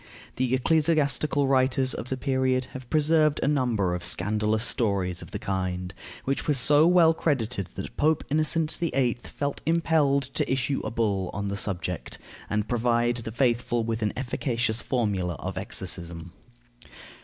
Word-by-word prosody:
The 130 0 +1
ecclesiastical 150 0 +2
writers 130 0 +2
of 125 - -6
the 130 - -2
period 130 -1 0
have 130 -2 -9
preserved 155 -1 +3
a - - +1
number 120 -10 +1
of 90 0 -4
scandalous 105 +4 +1
stories 100 -7 0
of - - -10
the - - -5
kind, 95 -2 -3 0.3
which 135 +1 -2
were 150 - +2
so 145 +5 +6
well 170 -2 +5
credited 125 - -1
that 95 - -7
Pope 155 +1 +2
Innocent 155 +1 +2
VIII. 135 -8 0
felt 140 +2 -4
impelled 160 -4 +2
to - - -1
issue 135 +1 0
a - - -3
bull 100 -5 -1
on 100 0 -3
the 100 - -2
subject, 90 -3 -4 0.3
and 105 0 -1
provide 120 0 +1
the 115 -1 -6
faithful 120 -1 +1
with 115 0 -3
an 105 -1 0
efficacious 120 -2 -1
formula 100 -9 -1
of - - -6
exorcism. 85 0 -5
125 Hz, 155 wpm, -26 LUFS, 105-140 Hz, 0.3 s, so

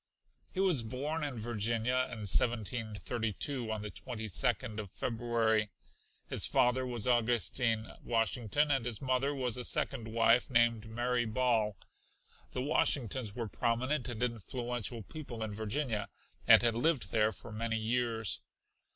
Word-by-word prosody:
He 185 - -5
was 185 -9 +5
born 140 +8 -3
in 140 -4 -3
Virginia 115 +3 0
in 115 -3 -6
1732, 115 +2 -1
on 110 -1 -3
the 105 - -5
22d 110 0 -2
of 105 -2 -5
February. 115 -1 0 0.6
His - - +1
father 125 +1 +2
was 120 -4 0
Augustine 120 -1 +2 0.2
Washington 115 +5 +1
and 135 -4 +2
his 115 -3 -3
mother 130 +1 +1
was 125 -3 -1
a 125 - -4
second 120 -1 -2
wife 115 +2 +3
named 115 -3 +2
Mary 120 +1 0
Ball. 110 -3 +1 0.7
The 125 - -3
Washingtons 130 -6 +1
were 115 -2 -3
prominent 125 +5 -1
and 120 0 -3
influential 120 0 -2
people 130 -5 -7
in 110 -1 -4
Virginia 110 +1 -2 0.4
and - - +8
had 120 -1 +5
lived 135 +4 +1
there 110 -1 +3
for 110 +3 -10
many 115 +1 -2
years. 115 -1 0
120 Hz, 135 wpm, -33 LUFS, 110-125 Hz, 0.7 s, and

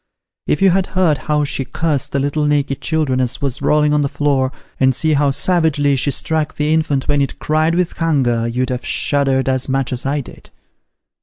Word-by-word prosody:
If - - +1
you 195 - +6
had 190 +1 +1
heard 165 -6 +3
how 150 0 +2
she 140 -1 -1
cursed 145 +2 -2
the - - -1
little 145 +2 0
naked 145 -2 0
children 150 -5 0
as 125 -1 -2
was 140 -2 -3
rolling 150 0 +2
on 150 - +2
the 140 - 0
floor, 140 -2 0 0.3
and 130 -1 +3
seen 155 +3 +1
how 145 0 +2
savagely 145 -2 +2
she 135 +2 0
struck 155 +2 -1
the 150 +1 0
infant 145 -4 0
when 145 -1 +2
it 140 - -2
cried 155 +2 0
with 180 -1 0
hunger, 130 -8 +1
you'd 125 +2 -2
have 125 0 -3
shuddered 135 -2 0
as 130 0 0
much 135 -1 -1
as 125 - -4
I 140 +2 -1
did. - - -13
145 Hz, 205 wpm, -17 LUFS, 135-155 Hz, 0.3 s, you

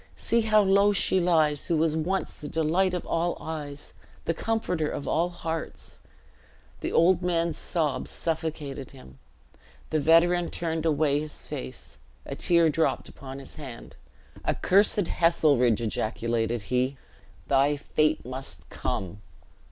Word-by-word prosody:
see 235 0 +1
how 215 -1 +4
low 200 +1 +4
she 190 -1 +2
lies 160 -4 +2
who 170 - +1
was 155 0 +2
once 180 +5 -1
the 150 - -8
delight 175 +4 +1
of 180 - -4
all 170 +1 0
eyes, 145 -3 -7 0.3
the 165 - +1
comforter 180 -7 -1
of 140 - -5
all 170 +2 +1
hearts." 165 -2 -5 0.8
The - - -3
old 175 +2 +4
man's 170 -2 0
sobs 155 -5 -1
suffocated 155 -4 -3
him. 65 - -15 0.7
The 155 - +2
veteran 170 +3 +4
turned 165 -1 -2
away 145 -2 +2
his 150 0 -7
face, 65 +1 -7 0.3
a - - -5
tear 170 -1 +4
dropped 160 +1 0
upon 135 -1 -9
his 135 - -11
hand. 130 -6 -9 0.5
"Accursed 200 +1 +3
Heselrigge," 145 - +3
ejaculated 115 0 -1
he, 130 +2 +1 0.5
"thy 140 +2 +3
fate 155 +2 0
must 130 -10 -7
come!" 95 +2 -3
160 Hz, 135 wpm, -27 LUFS, 140-175 Hz, 0.8 s, how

